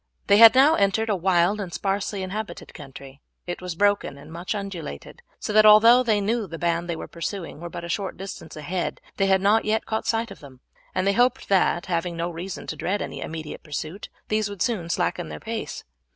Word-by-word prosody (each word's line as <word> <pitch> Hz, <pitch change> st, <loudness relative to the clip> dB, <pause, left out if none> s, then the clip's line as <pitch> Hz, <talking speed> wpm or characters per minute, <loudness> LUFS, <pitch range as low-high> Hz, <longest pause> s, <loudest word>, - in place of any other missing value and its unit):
They 200 Hz, -, +5 dB
had 225 Hz, +2 st, +9 dB
now 280 Hz, +4 st, +6 dB
entered 220 Hz, -1 st, +1 dB
a -, -, +2 dB
wild 185 Hz, +2 st, +2 dB
and 185 Hz, -3 st, -6 dB
sparsely 195 Hz, +1 st, -2 dB
inhabited 205 Hz, +3 st, -6 dB
country. 135 Hz, -1 st, -11 dB, 0.2 s
It 175 Hz, 0 st, -5 dB
was 180 Hz, -2 st, -5 dB
broken 200 Hz, -6 st, +1 dB
and 150 Hz, +3 st, -12 dB
much 175 Hz, +5 st, -4 dB
undulated, 185 Hz, -, -7 dB, 0.2 s
so 210 Hz, -, -4 dB
that 215 Hz, 0 st, +7 dB
although 220 Hz, +4 st, +8 dB
they 220 Hz, -4 st, +2 dB
knew 225 Hz, +4 st, 0 dB
that 200 Hz, -, -7 dB
the 165 Hz, -, -6 dB
band 170 Hz, +1 st, -1 dB
they 170 Hz, -, -1 dB
were -, -, -7 dB
pursuing 170 Hz, -2 st, -6 dB
were 170 Hz, +1 st, -6 dB
but 170 Hz, 0 st, -7 dB
a -, -, -5 dB
short 195 Hz, +2 st, -3 dB
distance 190 Hz, -4 st, -8 dB
ahead 170 Hz, +4 st, -3 dB, 0.2 s
they 195 Hz, -, +2 dB
had 190 Hz, -1 st, +3 dB
not 210 Hz, +3 st, +4 dB
yet 220 Hz, +1 st, 0 dB
caught 220 Hz, -, -3 dB
sight 230 Hz, 0 st, 0 dB
of -, -, -10 dB
them, 135 Hz, -4 st, -14 dB, 0.4 s
and 185 Hz, -, +1 dB
they 200 Hz, -, +3 dB
hoped 245 Hz, +4 st, +1 dB
that, 190 Hz, -2 st, +2 dB
having 170 Hz, -1 st, -2 dB
no 170 Hz, +1 st, -2 dB
reason 175 Hz, +3 st, -6 dB
to -, -, -5 dB
dread 200 Hz, +3 st, -1 dB
any -, -, -7 dB
immediate 160 Hz, -1 st, -6 dB
pursuit, 155 Hz, +5 st, -6 dB, 0.2 s
these 215 Hz, -1 st, 0 dB
would 200 Hz, -3 st, -2 dB
soon 195 Hz, -8 st, -2 dB
slacken 80 Hz, -, -1 dB
their 75 Hz, 0 st, -7 dB
pace. -, -, -5 dB
190 Hz, 220 wpm, -24 LUFS, 170-210 Hz, 0.4 s, had